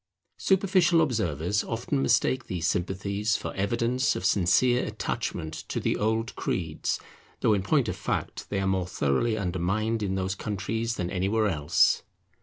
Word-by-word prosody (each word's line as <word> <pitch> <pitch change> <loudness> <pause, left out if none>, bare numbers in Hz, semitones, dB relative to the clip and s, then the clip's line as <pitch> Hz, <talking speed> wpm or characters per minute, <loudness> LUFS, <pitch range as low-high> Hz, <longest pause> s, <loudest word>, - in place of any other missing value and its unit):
Superficial 185 -3 +3
observers 100 - 0
often 120 +4 -2
mistake 130 -1 +2
these 85 -3 -3
sympathies 100 +5 0
for - - -5
evidence 115 +6 +1
of 90 - -4
sincere 105 +7 +3
attachment 80 -6 -3 0.2
to - - -1
the - - 0
old 110 +2 -1
creeds, - - -2 0.4
though 110 - +4
in 100 - +1
point 95 - +2
of - - -2
fact - - -3
they 100 - -1
are 95 - 0
more 95 -2 0
thoroughly 90 - 0
undermined 100 +4 -1
in 95 -2 -1
those 95 0 -1
countries 110 +3 -2
than 90 -1 -3
anywhere 100 +4 +1
else. 75 -5 +3
105 Hz, 150 wpm, -27 LUFS, 95-115 Hz, 0.4 s, though